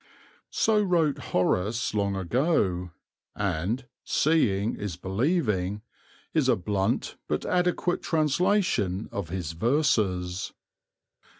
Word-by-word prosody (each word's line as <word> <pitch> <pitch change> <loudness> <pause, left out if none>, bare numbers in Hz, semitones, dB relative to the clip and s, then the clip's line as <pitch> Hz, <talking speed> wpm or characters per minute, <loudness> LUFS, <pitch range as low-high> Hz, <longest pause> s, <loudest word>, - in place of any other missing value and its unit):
So 215 -1 +2
wrote 170 -7 +2
Horace 100 +6 +1
long 100 -2 0
ago, 95 - +1 0.5
and 100 +6 -1 0.2
"seeing's 105 - +1
believing," 105 - 0 0.5
is 150 -5 +2
a 125 - +5
blunt 95 0 -1
but 75 - -1
adequate 180 0 +1
translation 155 - +1
of 100 -5 -4
his 90 -4 -3
verses. 95 - 0
105 Hz, 90 wpm, -27 LUFS, 95-155 Hz, 0.5 s, a